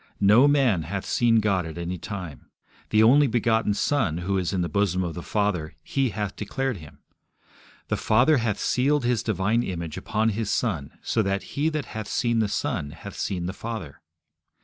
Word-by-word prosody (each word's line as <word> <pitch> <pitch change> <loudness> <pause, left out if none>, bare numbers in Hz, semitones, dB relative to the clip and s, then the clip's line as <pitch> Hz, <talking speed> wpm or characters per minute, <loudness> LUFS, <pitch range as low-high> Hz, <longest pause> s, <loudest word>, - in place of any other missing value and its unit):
No 105 +7 +6
man 135 - +3
hath 90 +5 -4
seen 115 -2 +3
God 100 -4 +1
at 80 - -8
any 85 +1 -4
time. 90 - -7 0.4
The 110 +1 +4
only 140 +6 +6
begotten 115 -3 +1
Son, 105 - +1
who 95 +3 -1
is 90 - -1
in 95 -2 0
the 85 - 0
bosom 95 +1 +1
of 85 -2 -3
the 85 - -6
Father, 95 -6 -1
He 135 -2 0
hath 105 -1 -4
declared 130 +3 -2
Him. 75 -3 -14 0.9
The - - -1
Father 125 +8 +4
hath 115 -4 0
sealed 140 +1 +1
His 120 -2 +1
divine 110 +2 +1
image 85 -7 -4
upon 110 +1 0
His 110 0 -2
Son, 70 0 -1
so 115 - +1
that 100 -1 -1
he 150 +3 +1
that 155 -2 -3
hath 110 -2 -6
seen 120 -2 0
the 110 - +2
Son 70 -6 -2
hath 90 +6 -10
seen 90 -3 -2
the 90 - -3
Father. 110 -9 -7
105 Hz, 190 wpm, -25 LUFS, 90-120 Hz, 0.9 s, No